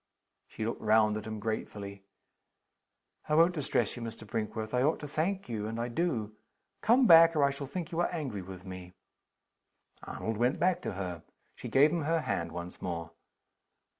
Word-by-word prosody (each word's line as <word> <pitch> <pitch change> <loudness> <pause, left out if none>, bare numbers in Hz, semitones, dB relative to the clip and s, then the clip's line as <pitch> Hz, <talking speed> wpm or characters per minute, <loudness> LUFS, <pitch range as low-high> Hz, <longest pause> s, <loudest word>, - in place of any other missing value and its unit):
She 110 - -5
looked 115 - -3
round 110 0 +4
at 105 -1 -5
him 110 -1 -5
gratefully. 100 -2 -5 1.3
"I 150 - +3
won't 165 +3 +5
distress 150 -5 0
you, 120 - -7
Mr. 115 -1 -7
Brinkworth. 110 +1 -4
I 125 - +2
ought 150 +5 +2
to 150 - -5
thank 175 +7 -1
you 110 -3 -3
and 115 +1 -4
I 120 +1 -2
do. 115 -8 -1 0.5
Come 245 +4 +5
back 165 -3 +8
or 150 - +3
I 140 - +4
shall 140 0 -6
think 170 +4 -5
you 165 - -2
are 175 - +2
angry 135 - -3
with 95 0 -10
me." 90 -1 -8 1.1
Arnold 110 -1 -4
went 125 +5 +1
back 180 0 +2
to - - -4
her. 90 -3 -5 0.3
She - - -8
gave 145 +3 +5
him 165 -3 -1
her 165 +1 +1
hand 85 - -2
once 85 +1 -7
more. 85 -2 -4
115 Hz, 185 wpm, -31 LUFS, 105-160 Hz, 1.3 s, back